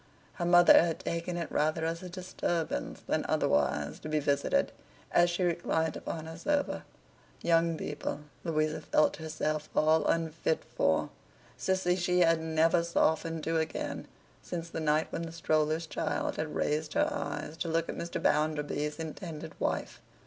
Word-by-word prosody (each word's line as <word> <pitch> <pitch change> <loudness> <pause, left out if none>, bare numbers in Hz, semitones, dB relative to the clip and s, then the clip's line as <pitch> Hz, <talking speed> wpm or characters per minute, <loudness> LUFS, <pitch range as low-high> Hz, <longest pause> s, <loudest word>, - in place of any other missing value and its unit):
Her 175 - -3
mother 175 0 +8
had 165 -2 -1
taken 170 +1 -3
it 170 -2 -4
rather 155 +2 +1
as 165 +1 -2
a 180 - -7
disturbance 175 -2 -3
than - - 0
otherwise, 70 +1 +1
to 155 - -7
be 155 0 +1
visited, 140 - +1 0.4
as 175 0 +5
she 175 +2 -1
reclined 165 -2 0
upon 160 -1 -5
her 160 +1 -8
sofa; 290 - 0 0.6
young 165 -1 +3
people, 145 -1 -4 0.2
Louisa 155 -2 0
felt 155 - +2
herself 155 -1 -2
all 155 +1 +4
unfit 160 -1 0
for; 80 0 +2 0.4
Sissy 185 -1 +1
she 180 0 +2
had 165 -1 +5
never 160 +1 +3
softened 165 -1 +1
to 165 0 +1
again, 160 - -3 0.3
since 170 -1 -5
the - - -3
night 155 0 +2
when - - -3
the 165 -1 -5
stroller's 155 0 +1
child - - -2
had 155 0 -3
raised 150 0 0
her - - +3
eyes 150 +1 -4
to 170 - -3
look 165 0 0
at - - -3
Mr. 170 - -4
Bounderby's 150 0 0
intended 160 0 -6
wife. - - -2
160 Hz, 155 wpm, -30 LUFS, 155-170 Hz, 0.6 s, mother